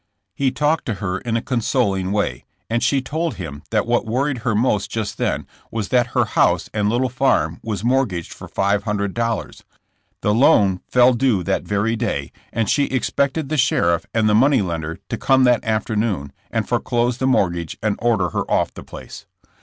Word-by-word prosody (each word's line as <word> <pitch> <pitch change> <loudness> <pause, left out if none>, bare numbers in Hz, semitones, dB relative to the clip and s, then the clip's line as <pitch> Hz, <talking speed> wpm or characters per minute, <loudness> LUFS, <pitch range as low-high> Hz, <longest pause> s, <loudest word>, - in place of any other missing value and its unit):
He 135 +4 +1
talked 150 +4 0
to 115 - -1
her 95 -1 -3
in 115 -1 -1
a 115 - -3
consoling 110 -6 0
way, 100 -12 -1 0.3
and 115 +1 +1
she 135 -2 +2
told 160 +4 -2
him 75 -6 -7
that 110 -2 +1
what 120 0 +1
worried 130 +3 0
her 115 -1 -1
most 105 -2 +1
just 110 -2 -4
then - - -1 0.2
was 110 -4 -3
that 125 -2 +3
her - - +4
house - - +1
and 105 -1 +1
little 120 +3 +1
farm 130 +2 +1
was 105 -4 -4
mortgaged 120 -9 0
for - - -10
five 100 +1 +1
hundred 100 -2 -1
dol 115 -3 0
76 - - -15
JESSiO - - -20
JAMKS. - - -36
lars, - - -42
the 105 - +2
loan 105 - +4
fell 125 0 +5
due 120 -6 +1
that 95 +2 -1
very 105 +3 0
day, 70 -10 -2 0.2
and 115 -2 -1
she 145 +6 +2
expected 140 +2 -1
the 155 - -1
sheriff 90 - +2
and 110 -1 +2
the 105 - +3
money 130 +1 +4
lender 80 -2 -4
to - - -3
come 130 -1 +4
that 125 -2 +3
after 110 0 -1
noon, 100 -11 -1 0.2
and - - -2
foreclose 120 +1 0
the 130 - +1
mortgage 85 -10 0
and 105 -2 +1
order 110 -7 +2
her - - -3
off - - +1
the - - -9
place. - - -11
115 Hz, 205 wpm, -21 LUFS, 100-130 Hz, 0.3 s, fell